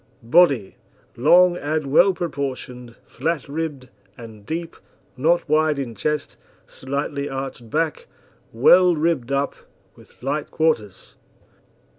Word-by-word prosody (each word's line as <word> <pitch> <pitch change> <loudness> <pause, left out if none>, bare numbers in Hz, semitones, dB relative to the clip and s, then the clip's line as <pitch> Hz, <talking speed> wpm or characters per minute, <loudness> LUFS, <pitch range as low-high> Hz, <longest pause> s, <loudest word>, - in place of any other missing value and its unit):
BODY 135 - +3 0.4
Long 175 +7 +5
and 150 -2 -3
well 180 +6 +6
proportioned, 130 -8 -5
flat 165 -4 -3
ribbed, 145 -3 -5 0.3
and 110 -3 -12
deep, 165 +1 -4 0.4
not 165 +7 +1
wide 155 -1 +2
in 130 -4 -4
chest, 150 +8 -3 0.3
slightly 140 +1 -4
arched 135 -3 -6
back, 160 +3 -2 0.4
well 175 +9 +5
ribbed 150 -5 -1
up, 140 0 0 0.4
with - - -20
light 145 +3 -2
quarters. 110 -12 -2
145 Hz, 110 wpm, -22 LUFS, 130-160 Hz, 0.4 s, well